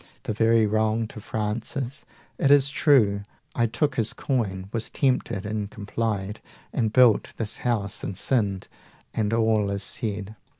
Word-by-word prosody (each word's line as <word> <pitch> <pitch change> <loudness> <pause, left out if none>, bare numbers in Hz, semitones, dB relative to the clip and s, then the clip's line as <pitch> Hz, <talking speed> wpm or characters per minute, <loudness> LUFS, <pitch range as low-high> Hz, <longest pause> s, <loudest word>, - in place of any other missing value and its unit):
The - - -2
very 115 +1 +4
wrong 110 +1 +1
to 110 - -9
Francis! 115 +6 -3 0.3
it 140 - +3
is 140 -1 +6
true 135 -9 +4 0.3
I 120 -1 +2
took 130 +5 -1
his 115 -2 +1
coin, 100 -8 -2
was 115 -1 -2
tempted 120 -7 0
and 105 -1 -3
complied, 105 -1 -3 0.3
And 110 -2 +1
built 125 -3 +4
this 110 -2 -3
house 105 -5 -2
and 95 - -4
sinned, 100 -7 0 0.5
and 105 -2 0
all 110 -3 +2
is 100 0 -2
said. 105 -2 -3
110 Hz, 145 wpm, -25 LUFS, 105-120 Hz, 0.5 s, is